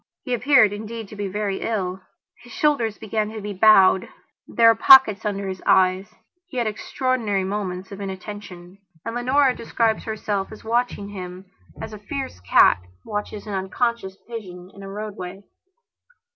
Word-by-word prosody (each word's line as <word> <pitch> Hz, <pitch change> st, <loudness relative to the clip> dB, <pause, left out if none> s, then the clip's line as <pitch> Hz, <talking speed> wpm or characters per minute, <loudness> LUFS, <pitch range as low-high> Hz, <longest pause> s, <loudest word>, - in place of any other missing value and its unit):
He 250 Hz, -, -3 dB
appeared, 245 Hz, -3 st, +4 dB
indeed, 220 Hz, +1 st, -7 dB
to -, -, -10 dB
be 205 Hz, -1 st, -3 dB
very 200 Hz, 0 st, -2 dB
ill; 190 Hz, -4 st, -2 dB, 0.4 s
his 245 Hz, -, -15 dB
shoulders 235 Hz, -7 st, +1 dB
began 215 Hz, -1 st, -2 dB
to 220 Hz, 0 st, -7 dB
be 205 Hz, 0 st, -5 dB
bowed; 190 Hz, -2 st, +5 dB, 0.4 s
there 230 Hz, -1 st, +4 dB
were -, -, +7 dB
pockets 225 Hz, -3 st, +7 dB
under 200 Hz, -1 st, -2 dB
his 185 Hz, -1 st, -5 dB
eyes; 190 Hz, +3 st, +3 dB, 0.3 s
he 275 Hz, -, -9 dB
had 240 Hz, -, +1 dB
extraordinary 220 Hz, -1 st, -1 dB
moments 190 Hz, -1 st, -4 dB
of 200 Hz, 0 st, -8 dB
inattention. 190 Hz, -2 st, -8 dB, 0.3 s
And 230 Hz, -, -4 dB
Leonora 255 Hz, +2 st, +2 dB
describes 225 Hz, -1 st, -1 dB
herself 210 Hz, -3 st, -3 dB
as 215 Hz, -, -11 dB
watching 230 Hz, -3 st, -1 dB
him 185 Hz, -1 st, -8 dB, 0.3 s
as -, -, -7 dB
a 210 Hz, -, -8 dB
fierce 240 Hz, -, -6 dB
cat 90 Hz, 0 st, +4 dB, 0.2 s
watches 205 Hz, 0 st, -5 dB
an 210 Hz, -, -6 dB
unconscious 190 Hz, +1 st, -2 dB
pigeon 185 Hz, -6 st, -9 dB
in 200 Hz, -, -13 dB
a 195 Hz, -, -8 dB
roadway. 200 Hz, -2 st, -7 dB
210 Hz, 160 wpm, -23 LUFS, 190-225 Hz, 0.4 s, were